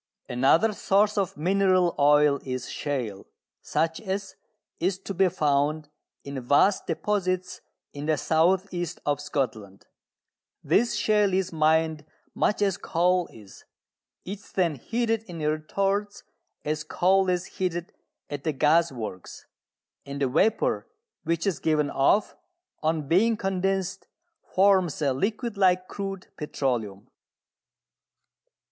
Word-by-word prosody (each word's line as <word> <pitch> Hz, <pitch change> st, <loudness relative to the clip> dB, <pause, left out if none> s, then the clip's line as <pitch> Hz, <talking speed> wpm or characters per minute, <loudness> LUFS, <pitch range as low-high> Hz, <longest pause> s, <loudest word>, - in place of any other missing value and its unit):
Another 140 Hz, -, +3 dB
source 205 Hz, +1 st, +2 dB
of 195 Hz, -4 st, -1 dB
mineral 185 Hz, +1 st, +2 dB
oil 145 Hz, 0 st, +5 dB
is 130 Hz, -1 st, -4 dB
shale, 120 Hz, -9 st, -4 dB, 0.3 s
such 160 Hz, +3 st, -1 dB
as 195 Hz, -1 st, -4 dB, 0.4 s
is 185 Hz, +2 st, 0 dB
to 195 Hz, +1 st, -7 dB
be 190 Hz, 0 st, +3 dB
found 150 Hz, 0 st, 0 dB, 0.3 s
in 140 Hz, -2 st, -6 dB
vast 145 Hz, +10 st, +3 dB
deposits 185 Hz, +1 st, -1 dB, 0.3 s
in 145 Hz, +1 st, -6 dB
the 155 Hz, -1 st, +2 dB
south 180 Hz, +7 st, +2 dB
east 175 Hz, -2 st, -4 dB
of 145 Hz, 0 st, 0 dB
Scotland. 110 Hz, -9 st, -4 dB, 0.8 s
This 235 Hz, +2 st, +2 dB
shale 210 Hz, -3 st, +2 dB
is 190 Hz, -2 st, -1 dB
mined 160 Hz, 0 st, +2 dB, 0.3 s
much 210 Hz, -, +1 dB
as 195 Hz, -2 st, +1 dB
coal 180 Hz, +1 st, +1 dB
is: 105 Hz, -4 st, -15 dB, 0.6 s
it 195 Hz, +2 st, -5 dB
is -, -, -19 dB
then 175 Hz, -4 st, +1 dB
heated 225 Hz, -, -1 dB
in 175 Hz, -4 st, -9 dB
retorts 195 Hz, +7 st, -1 dB, 0.4 s
as 150 Hz, 0 st, -1 dB
coal 190 Hz, +4 st, +2 dB
is 180 Hz, -1 st, 0 dB
heated 175 Hz, -2 st, -4 dB, 0.3 s
at 145 Hz, -1 st, -6 dB
the 155 Hz, -, 0 dB
gas 160 Hz, +4 st, +3 dB
works: 110 Hz, -7 st, -8 dB, 0.6 s
and 140 Hz, 0 st, -7 dB
the 140 Hz, -, +2 dB
vapour 185 Hz, -, +1 dB, 0.4 s
which 165 Hz, +2 st, 0 dB
is 195 Hz, -4 st, 0 dB
given 150 Hz, -2 st, +1 dB
off, 200 Hz, +10 st, +2 dB, 0.5 s
on 155 Hz, -2 st, -1 dB
being 215 Hz, +8 st, +3 dB
condensed, 195 Hz, 0 st, -2 dB, 0.5 s
forms 190 Hz, -4 st, +3 dB
a 140 Hz, -4 st, +1 dB
liquid 215 Hz, -, -2 dB
like 185 Hz, -1 st, +3 dB
crude 195 Hz, -2 st, -5 dB
petroleum. 120 Hz, -10 st, -3 dB
170 Hz, 125 wpm, -26 LUFS, 145-195 Hz, 0.8 s, oil